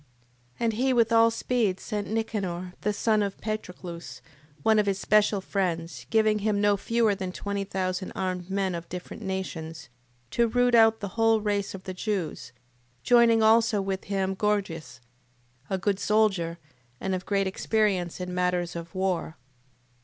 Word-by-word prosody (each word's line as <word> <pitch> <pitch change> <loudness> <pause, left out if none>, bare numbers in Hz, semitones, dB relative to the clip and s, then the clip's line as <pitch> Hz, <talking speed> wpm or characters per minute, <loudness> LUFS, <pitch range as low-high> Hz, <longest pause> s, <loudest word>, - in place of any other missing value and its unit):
And 230 -1 +1
he 260 +4 +1
with 230 -2 +3
all 230 0 +6
speed 225 -4 0
sent 205 -1 -4
Nicanor, 195 -5 -3
the 210 - +1
son 215 +1 +1
of 200 -1 -3
Patroclus, 180 -5 -6 0.4
one 220 -1 +4
of 210 - +1
his 195 -1 +1
special 210 0 +3
friends, 175 -4 -2
giving 215 -1 +3
him 210 0 0
no 205 0 +4
fewer 225 +2 +1
than 190 -2 -4
twenty 200 +1 -3
thousand 185 -1 -3
armed 185 -1 -3
men 190 -1 0
of 170 0 -6
different 180 +4 -7
nations, 165 -7 -5 0.4
to 235 0 +3
root 245 +1 +2
out 225 -1 +5
the 200 - -3
whole 225 +2 +3
race 205 -2 -1
of 190 - -10
the 185 - -5
Jews, 185 - -3 0.5
joining 235 -2 +5
also 225 0 +4
with 195 -1 -3
him 195 -1 -1
Gorgias, 170 - -2 0.7
a 190 - 0
good 195 +1 0
soldier, 200 -6 +1 0.4
and 190 - -2
of 185 0 -4
great 200 -1 +1
experience 190 -3 0
in 180 0 -4
matters 180 -1 0
of 170 +1 -7
war. 185 -4 -1
200 Hz, 160 wpm, -27 LUFS, 180-220 Hz, 0.7 s, all